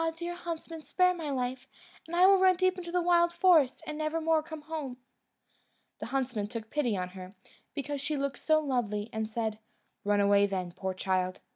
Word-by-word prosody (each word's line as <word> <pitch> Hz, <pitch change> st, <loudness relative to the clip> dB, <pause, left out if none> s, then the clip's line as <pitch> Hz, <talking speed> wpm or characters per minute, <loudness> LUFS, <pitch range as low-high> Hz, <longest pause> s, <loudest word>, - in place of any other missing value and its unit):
dear 345 Hz, +1 st, -4 dB
huntsman, 330 Hz, -2 st, -6 dB
spare 365 Hz, +3 st, +2 dB
my 325 Hz, -4 st, -5 dB
life, 260 Hz, -1 st, -3 dB, 0.4 s
and 335 Hz, -, -4 dB
I 360 Hz, +1 st, +6 dB
will 390 Hz, 0 st, +7 dB
run 375 Hz, 0 st, +5 dB
deep 370 Hz, +1 st, +2 dB
into 345 Hz, -2 st, -7 dB
the 355 Hz, 0 st, +1 dB
wild 345 Hz, 0 st, +4 dB
forest, 340 Hz, -8 st, +4 dB
and 305 Hz, 0 st, -5 dB
never 310 Hz, +1 st, -1 dB
more 320 Hz, 0 st, +2 dB
come 315 Hz, -1 st, -9 dB
home." 300 Hz, -5 st, -5 dB, 1.0 s
The -, -, -5 dB
huntsman 250 Hz, -5 st, -1 dB
took 225 Hz, 0 st, -7 dB
pity 245 Hz, -9 st, 0 dB
on 180 Hz, 0 st, -3 dB
her, 185 Hz, +1 st, -10 dB, 0.4 s
because 285 Hz, -1 st, -3 dB
she 290 Hz, +1 st, -2 dB
looked 280 Hz, 0 st, -2 dB
so 310 Hz, -1 st, +3 dB
lovely, 230 Hz, -6 st, -2 dB
and 220 Hz, 0 st, -2 dB
said, 220 Hz, -1 st, -2 dB, 0.4 s
"Run 205 Hz, 0 st, +2 dB
away 200 Hz, 0 st, +4 dB
then, 185 Hz, -3 st, -3 dB
poor 190 Hz, +1 st, -4 dB
child!" 185 Hz, -1 st, -1 dB
280 Hz, 190 wpm, -30 LUFS, 215-330 Hz, 1.0 s, will